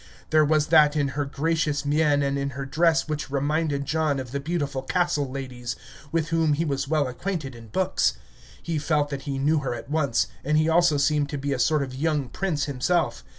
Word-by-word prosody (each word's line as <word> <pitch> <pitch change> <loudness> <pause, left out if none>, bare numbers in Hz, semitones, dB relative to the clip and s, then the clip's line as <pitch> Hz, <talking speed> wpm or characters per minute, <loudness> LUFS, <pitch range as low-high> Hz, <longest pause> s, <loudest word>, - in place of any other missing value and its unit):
There 155 -1 +5
was 155 0 +3
that 150 -2 +6
in 145 -2 +1
her 145 +2 -2
gracious 150 0 -1
mien 145 -1 +2
and 140 0 0
in 140 0 -1
her 140 - -3
dress 165 +3 +2
which 150 -3 -3
reminded 145 +1 0
John 155 -2 0
of 130 -2 -6
the 140 - -2
beautiful 145 -3 -2
castle 150 -2 0
ladies, 125 -3 -5 0.4
with 165 -1 0
whom 165 -2 +2
he 160 +3 0
was 140 -2 -2
well 150 -2 +1
acquainted 145 +1 -4
in 115 -1 -12
books. 185 - +1 0.5
He 165 -2 -2
felt 145 -1 0
that 140 -1 -4
he 135 - -2
knew 150 +3 +2
her 135 -4 -3
at 135 - -9
once, 140 -6 +1 0.2
and 150 +3 +1
he 155 +1 +3
also 165 -2 +4
seemed 145 0 +1
to 145 - -3
be 140 +1 -2
a 130 - -3
sort 155 +1 +2
of 130 -1 -6
young 145 -1 -1
prince 170 -7 -2
himself. 145 +5 0
145 Hz, 210 wpm, -25 LUFS, 140-160 Hz, 0.5 s, that